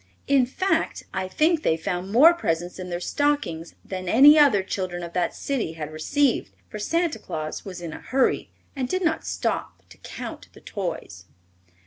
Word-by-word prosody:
In 275 -3 +4
face, 325 +5 -1
I 190 -1 -2
think 310 - +2
they 160 - +1
found 180 +2 -3
more 295 +10 +7
presents 175 - -2
in 180 0 -6
their 175 0 -3
stockings 235 - -1
than 185 -1 -5
any 280 +8 +8
other 280 -11 +5
children 185 -2 -4
of 170 0 -7
that 180 -1 0
city 260 - -2
had 155 -1 -6
received, 275 - +1 0.2
for 210 - -6
Santa 330 +2 0
Claus 155 -5 -5
was 185 -3 -7
in 165 -2 -5
a - - -9
hurry 265 0 +1 0.3
and 255 -2 -2
did 370 0 -1
not 320 -2 0
stop - - -3
to - - -16
count - - -8
the - - -16
toys. 175 - -5
200 Hz, 175 wpm, -24 LUFS, 175-290 Hz, 0.3 s, any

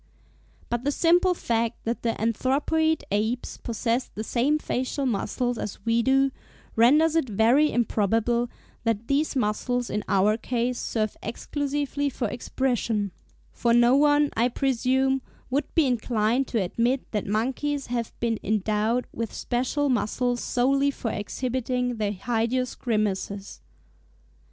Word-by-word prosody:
But 240 0 -2
the 285 - +1
simple 350 +4 +3
fact 230 -5 -1
that 230 +1 -2
the 230 -1 -1
anthropoid 280 +8 +1
apes 220 +4 -1
possess 235 +2 -1
the 215 - -3
same 260 +7 +1
facial 270 -1 -2
muscles 245 +1 -1
as 205 - -4
we 230 0 +3
do, 270 +2 +3 0.4
renders 300 +8 +5
it 320 -7 +1
very 235 +9 +4
improbable 235 +1 +1 0.3
that 230 -1 -1
these 285 +2 +1
muscles 245 +1 -1
in 210 +1 -1
our 205 +3 +3
case 245 +1 -1
serve 215 -2 -1
exclusively 285 +4 -2
for 240 -3 -2
expression; 230 -3 -1 0.4
for 235 -1 +2
no 240 +2 +5
one, 290 0 +4
I 235 +2 +3
presume, 265 +1 +1 0.3
would 285 +3 -1
be 325 -3 +5
inclined 240 0 +1
to 230 - 0
admit 240 +8 -1
that 210 -3 -2
monkeys 265 +7 -1
have 235 -2 -3
been 230 -2 0
endowed 215 +3 0
with 230 -2 -3
special 260 +4 -1
muscles 245 0 0
solely 275 +3 +2
for 240 -5 -3
exhibiting 250 +2 -2
their 210 -2 0
hideous 240 +4 -1
grimaces. 205 -3 -2
245 Hz, 130 wpm, -26 LUFS, 225-270 Hz, 0.4 s, renders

